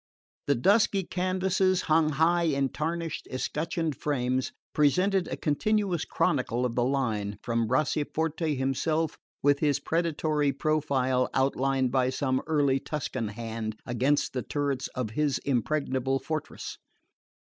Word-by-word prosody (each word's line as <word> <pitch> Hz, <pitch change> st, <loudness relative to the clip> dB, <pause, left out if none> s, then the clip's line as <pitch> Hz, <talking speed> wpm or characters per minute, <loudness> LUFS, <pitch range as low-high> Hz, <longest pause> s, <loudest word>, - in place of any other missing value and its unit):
The 140 Hz, -, +3 dB
dusky 200 Hz, -, +3 dB
canvases, 185 Hz, +1 st, +1 dB
hung 155 Hz, 0 st, +3 dB
high 170 Hz, +4 st, +3 dB
in 140 Hz, -4 st, +1 dB
tarnished 165 Hz, +3 st, -3 dB
escutcheoned 160 Hz, +4 st, -2 dB
frames, 130 Hz, -3 st, -1 dB, 0.2 s
presented 180 Hz, +6 st, +3 dB
a -, -, -4 dB
continuous 185 Hz, +3 st, 0 dB
chronicle 125 Hz, -3 st, 0 dB
of 120 Hz, -, -1 dB
the 120 Hz, -, +1 dB
line, 115 Hz, -6 st, -1 dB
from 115 Hz, -1 st, 0 dB
Bracciaforte 155 Hz, +4 st, 0 dB
himself, 155 Hz, +4 st, 0 dB, 0.2 s
with 145 Hz, 0 st, +4 dB
his 145 Hz, -3 st, +2 dB
predatory 155 Hz, -3 st, 0 dB
profile 135 Hz, -3 st, +1 dB
outlined 135 Hz, -1 st, +1 dB
by 130 Hz, -1 st, +2 dB
some 130 Hz, 0 st, 0 dB
early 145 Hz, -4 st, +2 dB
Tuscan 130 Hz, -6 st, -3 dB
hand 110 Hz, 0 st, -5 dB
against 130 Hz, +5 st, +1 dB
the 130 Hz, -, -1 dB
turrets 140 Hz, -2 st, -2 dB
of 125 Hz, -4 st, -2 dB
his 145 Hz, +2 st, +1 dB
impregnable 135 Hz, 0 st, 0 dB
fortress. 155 Hz, +2 st, -5 dB
145 Hz, 125 wpm, -28 LUFS, 130-160 Hz, 0.2 s, with